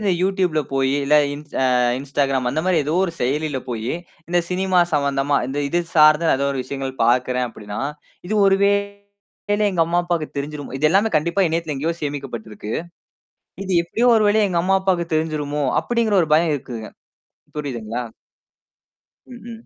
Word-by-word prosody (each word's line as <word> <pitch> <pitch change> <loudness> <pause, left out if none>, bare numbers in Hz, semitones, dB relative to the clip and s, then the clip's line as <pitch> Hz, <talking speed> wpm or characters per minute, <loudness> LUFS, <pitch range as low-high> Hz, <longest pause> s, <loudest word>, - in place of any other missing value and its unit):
இந்த 205 -2 +1
YouTubeல 185 -4 +1
போயி, 135 0 +1
இல்ல, 150 +2 +3 0.2
இன் 145 - -8 0.2
அ - - +2 0.4
Instagram 135 -1 0
அந்தமாரி 175 +6 0
எதோ 150 - -1
ஒரு 175 - -3
செயலில 145 +2 -1
போயி, 115 +1 -3 0.4
இந்த 175 - +2
சினிமா 185 0 +1 0.2
சம்பந்தமா, 140 0 +1
இந்த 135 +2 -3
இது 175 +5 +1 0.2
சார்ந்து 155 +1 +6
நான் - - +3
எதோ 140 0 0
ஒரு 135 - -2
விஷயங்கள் 135 0 -5
பார்க்கிறேன் 125 +1 +2
அப்பிடின்னா, 105 -2 -7 0.5
இது 215 - -1
ஒருவேளை 200 +1 -1
எங்க 170 -2 +2
அம்மா, 170 +1 +1
அப்பாவுக்குத் 170 -4 -3
தெரிஞ்சுருமோ 145 -1 -6
இது 155 - +3
எல்லாமே 200 +5 +3
கண்டிப்பா 170 +5 0
இணையத்தில 160 -1 -2
எங்கேயோ 160 +5 -1
சேமிக்கப்பட்டிருக்கு. 115 -7 -5 0.9
இது 190 - -3
எப்பிடியோ 235 +8 +1
ஒருவழியா, 210 0 +3
எங்க 170 -1 +1
அம்மா, 190 +2 +3
அப்பாவுக்கு 180 -3 0
தெரிஞ்சுருமோ! 150 -2 -1 0.2
அப்பிடிங்கிற 230 -3 0
ஒரு 160 - -2
பயம் 165 0 +3
இருக்குங்க. 120 -5 -6 0.7
புரியுதுங்களா? 120 -5 -4 1.2
ம், 245 -2 -12
ம். 230 0 -10
155 Hz, 155 wpm, -21 LUFS, 135-190 Hz, 1.2 s, சார்ந்து